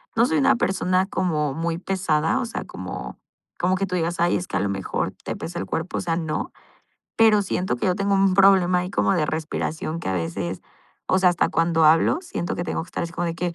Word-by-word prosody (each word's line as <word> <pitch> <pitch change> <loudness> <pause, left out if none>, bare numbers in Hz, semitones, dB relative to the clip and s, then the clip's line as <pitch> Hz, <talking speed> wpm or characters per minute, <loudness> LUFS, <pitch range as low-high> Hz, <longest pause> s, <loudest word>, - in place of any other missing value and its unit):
no 230 - +4
soy 160 - +1
una 140 - +4
persona 185 -3 +1
como 155 -8 -1
muy 165 +1 -2
pesada, 170 -5 0
o - - -1
sea, 230 - -5
como - - -7 0.4
como 185 +1 +2
que 195 +1 -1
tú 180 -1 -3
digas: 170 0 -1
"Ay, 175 - +3
es 180 - -5
que - - -5
a - - +1
lo 100 - 0
mejor 95 -1 -2
te - - -3
pesa 170 +1 -6
el - - -3
cuerpo", 160 +3 -3
o - - -1
sea, 165 -3 -1
no. 160 -2 -3 0.6
Pero 215 -2 +5
siento 185 -7 -1
que - - -4
yo 180 - +2
tengo 200 +1 0
un 195 -1 +3
problema 185 -2 +5
ahí 180 +1 -3
como 195 - +1
de 160 -5 +1
respiración 160 +1 -3
que - - -5
a - - 0
veces, 85 +2 -3 0.5
o 185 - +4
sea, 185 -1 +5
hasta 175 - +1
cuando 165 -1 +2
hablo, 165 - +4
siento 335 - -4
que 175 - -3
tengo - - -2
que - - -19
estar - - -4
así 170 0 -5
como 175 0 -2
de 165 -1 -2
que 175 0 -3
175 Hz, 245 wpm, -23 LUFS, 160-185 Hz, 0.6 s, Pero